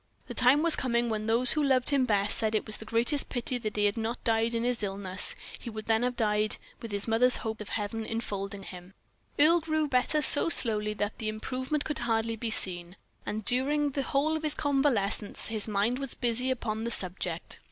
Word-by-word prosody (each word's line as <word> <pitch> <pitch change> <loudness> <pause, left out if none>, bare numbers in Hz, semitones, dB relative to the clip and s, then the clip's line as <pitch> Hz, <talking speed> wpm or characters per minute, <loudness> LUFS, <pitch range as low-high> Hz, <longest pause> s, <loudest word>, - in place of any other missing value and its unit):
The - - -7
time 255 +5 +4
was 335 -1 +8
coming 235 -2 0
when 215 0 -3
those 235 +3 +5
who 305 - +3
loved 265 -2 +3
him 275 -2 +3
best 205 -1 +2
said 220 -1 +1
it 215 - 0
was 215 - +1
the 220 - -10
greatest 235 +6 +1
pity 245 0 -2
that 215 -3 -5
he 205 - +2
had 205 +2 +1
not 225 +2 -3
died 225 0 +2
in 230 - -1
this 245 -2 -1
illness; 195 -2 -2 0.2
he - - -7
would 215 -1 -7
then 225 0 +2
have 250 0 -1
died 210 -1 0 0.2
with 230 - -7
his 200 +1 -2
mother's 240 +3 +3
hope 220 0 -4
of 210 - -8
heaven 220 +1 -3
infolding 200 -3 -4
him. 180 0 -11 0.4
Earle 320 +4 +5
grew 310 -1 0
better 280 +3 +1
so 295 - +3
slowly 210 -7 +1
that 205 0 -3
the 215 - -2
improvement 260 +7 -3
could 300 - -3
hardly 230 -1 0
be 225 +1 -4
seen, 180 -4 +2 0.3
and 215 0 -4
during 285 +5 +1
the 275 - -2
whole 285 +4 0
of 315 - -3
his 305 -1 +2
convalescence, 265 -10 0
his 220 -2 -3
mind 215 +4 0
was 275 -3 -3
busy 245 +1 -1
upon 225 -4 -2
the 235 - -2
subject. 180 -5 -3
230 Hz, 215 wpm, -28 LUFS, 210-260 Hz, 0.4 s, was